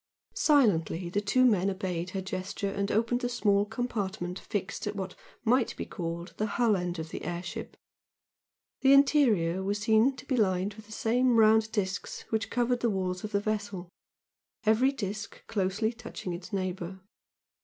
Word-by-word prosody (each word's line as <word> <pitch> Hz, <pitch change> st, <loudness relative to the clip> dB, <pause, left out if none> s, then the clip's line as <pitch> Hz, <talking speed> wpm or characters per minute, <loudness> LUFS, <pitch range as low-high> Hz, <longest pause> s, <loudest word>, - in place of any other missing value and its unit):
Silently 190 Hz, -, +3 dB
the 205 Hz, -, +1 dB
two 255 Hz, +5 st, +3 dB
men 200 Hz, -5 st, +3 dB
obeyed 185 Hz, -2 st, -3 dB
her 190 Hz, +1 st, -3 dB
gesture 190 Hz, +1 st, -3 dB
and 200 Hz, 0 st, -1 dB
opened 230 Hz, +3 st, +1 dB
the 245 Hz, -, -1 dB
small 205 Hz, -4 st, +2 dB
compartment 205 Hz, -5 st, -3 dB
fixed 205 Hz, 0 st, -4 dB
at 205 Hz, -, -3 dB
what 190 Hz, -2 st, -4 dB, 0.3 s
might 245 Hz, +1 st, +2 dB
be -, -, -3 dB
called 170 Hz, -1 st, -5 dB
the 215 Hz, -, 0 dB
hull 235 Hz, -3 st, +4 dB
end 180 Hz, -1 st, -2 dB
of 160 Hz, 0 st, -5 dB
the -, -, -6 dB
air 175 Hz, 0 st, -3 dB
ship. 175 Hz, -, -7 dB, 1.0 s
The 270 Hz, 0 st, +6 dB
interior 235 Hz, -, +4 dB
was 200 Hz, +2 st, -1 dB
seen 220 Hz, +5 st, +3 dB
to 260 Hz, -, -11 dB
be 270 Hz, -, 0 dB
lined 195 Hz, -3 st, +1 dB
with 215 Hz, +1 st, -13 dB
the -, -, -15 dB
same 245 Hz, +3 st, +2 dB
round 220 Hz, 0 st, +5 dB
discs 195 Hz, -3 st, -2 dB
which 220 Hz, 0 st, 0 dB
covered 245 Hz, 0 st, +1 dB
the 240 Hz, -, +1 dB
walls 185 Hz, -2 st, -2 dB
of 215 Hz, -, -5 dB
the 200 Hz, -, +2 dB
vessel, 205 Hz, -4 st, -3 dB, 0.8 s
every 225 Hz, +5 st, +4 dB
disc 210 Hz, -4 st, -6 dB
closely 205 Hz, +3 st, 0 dB
touching 210 Hz, -6 st, -6 dB
its 175 Hz, +4 st, -8 dB
neighbour. 185 Hz, -1 st, -3 dB
205 Hz, 170 wpm, -29 LUFS, 185-225 Hz, 1.0 s, The